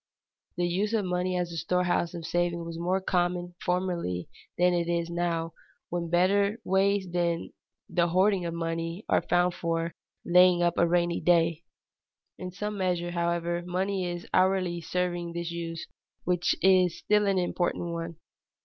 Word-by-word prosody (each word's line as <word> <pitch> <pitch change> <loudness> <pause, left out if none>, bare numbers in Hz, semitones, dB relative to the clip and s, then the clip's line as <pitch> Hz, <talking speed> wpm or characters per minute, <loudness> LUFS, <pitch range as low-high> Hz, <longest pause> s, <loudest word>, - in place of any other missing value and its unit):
The 175 - +1
use 200 +5 -1
of 210 -3 0
money 180 0 -1
as 175 -1 -2
a 165 - -5
storehouse 175 +1 0
of 165 -2 -6
saving 175 0 -1
was 165 0 -6
more 180 +3 +1
common 175 -1 -1
formerly 175 - -1 0.3
than 180 0 +4
it 170 -1 0
is 170 0 -1
now, 170 -1 -1 0.4
when 170 -1 -3
better 200 +5 +2
ways 195 +1 +2
than 170 -1 -1 0.4
the 170 -1 +1
hoarding 185 +2 +2
of 170 -1 -3
money 165 +3 -3
are - - +3
found 175 0 +2
for 165 -1 -2 0.3
"laying 180 0 +5
up 175 -1 +1
for 170 - +5
a - - 0
rainy 175 0 +1
day." 170 -1 +2 0.7
In 185 - -5
some 210 +2 -4
measure, 175 -2 0
however, 170 0 -1
money 185 +1 -1
is 175 0 -5
hourly 185 -2 +2
serving 175 -1 -2
this 170 0 -4
use, 165 -1 -5 0.4
which 175 0 +1
is 185 -2 +4
still 210 -1 +2
an 195 -1 +2
important 175 -1 -1
one. 165 0 -5
175 Hz, 160 wpm, -28 LUFS, 170-185 Hz, 0.7 s, laying